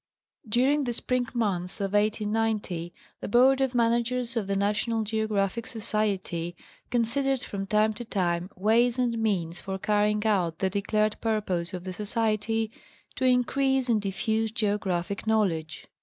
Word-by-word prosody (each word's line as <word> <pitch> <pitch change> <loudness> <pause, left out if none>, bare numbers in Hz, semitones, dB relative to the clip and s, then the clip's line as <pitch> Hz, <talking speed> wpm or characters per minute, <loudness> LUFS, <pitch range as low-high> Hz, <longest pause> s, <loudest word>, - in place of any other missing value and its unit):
During 270 +6 +3
the 240 - -1
spring 250 +1 -1
months 190 -5 -1
of 200 0 -2
1890, 210 -4 0 0.3
the - - -5
Board 260 +5 +5
of 265 -2 0
Managers 235 +1 +1
of 220 -4 -1
the 200 - 0
National 210 +3 0
Geographic 215 0 -1
Society 200 -6 -2 0.3
considered 260 +3 +1
from 195 -4 -5
time 215 +1 +3
to 235 +3 -7
time 180 -5 -1
ways 230 +5 +3
and 240 -2 0
means 180 -6 -1
for 190 0 -4
carrying 210 +1 +1
out 180 -7 +1
the 190 -1 0
declared 215 +2 0
purpose 195 -6 -1
of 180 -2 -6
the 185 0 -5
Society 220 +2 -1 0.4
"to 260 - -1
increase 260 +1 +2
and 220 -3 +3
diffuse 220 +3 -1
geographic 200 -3 -1
knowledge." 170 -8 0
215 Hz, 140 wpm, -27 LUFS, 195-235 Hz, 0.4 s, Board